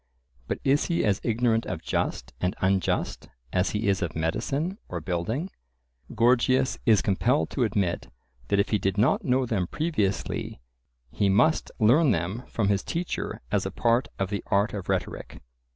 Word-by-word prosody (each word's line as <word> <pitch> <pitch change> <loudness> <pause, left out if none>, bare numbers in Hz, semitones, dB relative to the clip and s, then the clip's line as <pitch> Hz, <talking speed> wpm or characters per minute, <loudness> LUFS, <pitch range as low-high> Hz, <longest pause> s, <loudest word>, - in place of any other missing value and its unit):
But - - -1
is 140 +2 +3
he 170 -7 0
as 100 -3 +1
ignorant 115 0 +1
of 85 -3 -4
just - - -2
and 90 0 0
unjust 95 -1 0 0.2
as 90 +1 +2
he 105 +1 -2
is 100 -1 +2
of 85 -4 -3
medicine 135 - -1
or 90 - -3
building? 95 - -2 0.6
Gorgias 125 +3 +3
is 105 -7 +5
compelled 120 +8 +1
to 130 - 0
admit 100 -6 -1 0.4
that 100 - +2
if 100 - +2
he 105 - +1
did 95 +1 -1
not 135 - +3
know 130 -3 +2
them 100 -7 -1
previously 110 - -2 0.5
he 100 -2 +1
must 155 +12 +3
learn 135 +7 +5
them 95 +3 -1
from 105 -3 0
his 100 -1 +1
teacher 170 +1 -3
as - - +2
a - - -2
part 120 +2 +1
of 95 0 -2
the 100 - -2
art 100 +3 +2
of 100 -3 -6
rhetoric. - - -3
105 Hz, 170 wpm, -26 LUFS, 95-130 Hz, 0.6 s, is